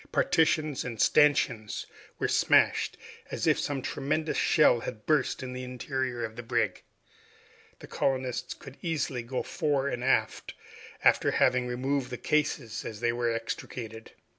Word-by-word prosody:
Partitions 155 -3 +2
and 115 -3 -6
stanchions 130 -8 +3 0.3
were - - 0
smashed, - - +3 0.3
as - - -3
if - - +3
some 140 -3 -2
tremendous 155 +3 -1
shell 150 -7 +4
had 110 -2 -7
burst 150 -4 +1
in 125 -1 -5
the 125 0 -5
interior 125 -1 -3
of 110 0 -8
the 120 - -6
brig. 115 - -1 1.0
The - - -8
colonists 130 -2 -2
could 135 -1 -12
easily 145 -7 -2
go 125 +2 -3
fore 145 -5 0
and 120 -2 -4
aft, 135 - 0 0.5
after - - +4
having 125 0 +2
removed 130 +2 -1
the 125 - -5
cases 150 -6 -1
as 110 -2 -7
they 120 0 +1
were 120 -1 0
extricated. 115 0 -6
130 Hz, 145 wpm, -29 LUFS, 120-145 Hz, 1.0 s, shell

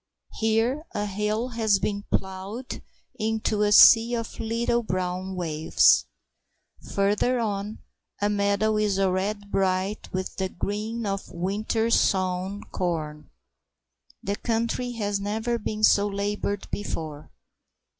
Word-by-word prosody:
Here 225 +6 +1
a 205 0 -1
hill 210 +4 -1
has 220 -4 +2
been 205 +1 -3
ploughed 190 +6 -4 0.4
into 220 -1 0
a 205 0 +3
sea 230 +3 +8
of 230 -1 -5
little 235 +1 0
brown 185 -2 -3
waves. 160 -3 +3 0.9
Further 205 +5 +2
on 210 -1 -3 0.4
a 205 - +1
meadow 205 +1 +1
is 210 -2 +1
already 195 +2 0
bright 195 +1 -1
with 185 0 -4
the 190 -1 -1
green 215 +5 -3
of 195 -1 -3
winter 215 +5 -1
sown 185 0 +1
corn. 155 -4 -3 0.9
The 200 +2 -2
country 235 +2 -1
has 205 -3 -1
never 220 +4 -2
been 215 0 -4
so 205 -1 +5
laboured 200 0 -2
before. 155 -7 -5
205 Hz, 115 wpm, -26 LUFS, 190-220 Hz, 0.9 s, sea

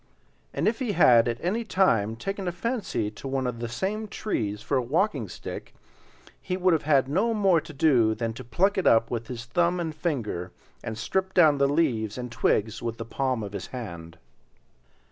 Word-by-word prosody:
And - - -1
if 225 +3 +1
he 245 -6 -1
had 120 -9 +6
at 115 -1 -1
any 220 +6 0
time 115 - +2
taken 195 - -4
a - - +1
fancy 195 - -2
to 110 - -9
one 135 -1 -1
of 125 -2 -3
the 120 0 -4
same 200 - -2
trees 105 - -3
for 140 - -1
a - - +2
walking 140 - 0
stick, - - -8 0.7
he 185 - -3
would 185 -1 +3
have 160 - +2
had 135 -3 +4
no 205 +11 +1
more 190 -6 +3
to - - -11
do 130 -7 +3
than 115 -1 -2
to 130 - -9
pluck 190 - +1
it - - +1
up 115 0 +4
with 115 -1 -3
his 120 -1 -6
thumb 175 +8 +1
and 165 -2 -3
finger 115 - -3 0.3
and 110 - -5
strip 190 +11 -2
down 155 -5 +5
the 140 - +4
leaves 125 -9 0
and 125 -1 -5
twigs 110 -2 0
with 115 -1 -3
the 115 - -5
palm 130 -1 -1
of 100 -1 -7
his - - -5
hand. 85 -9 -8
135 Hz, 200 wpm, -26 LUFS, 115-180 Hz, 0.7 s, had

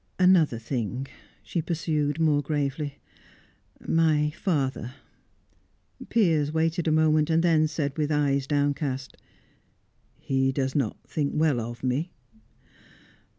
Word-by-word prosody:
"Another 180 -9 +4
thing," 125 +2 -3 0.4
she 170 - -2
pursued, 155 -2 -1
more 150 -3 +3
gravely. 145 0 -2 0.9
"My 155 -2 +2
father 135 - -2 0.6
" - - -19
Piers 160 -10 +2
waited 165 +2 0
a - - +3
moment, 155 0 +3
then 160 -3 +4
said 150 -2 -3
with 150 0 0
eyes 140 -2 +1
downcast: 145 -2 -1 1.0
"He 135 0 0
does 135 0 -1
not 135 -8 -1
think 145 -2 -2
well 150 -5 +2
of 120 +2 -6
me?" 135 +7 -1
150 Hz, 110 wpm, -26 LUFS, 135-160 Hz, 1.0 s, Another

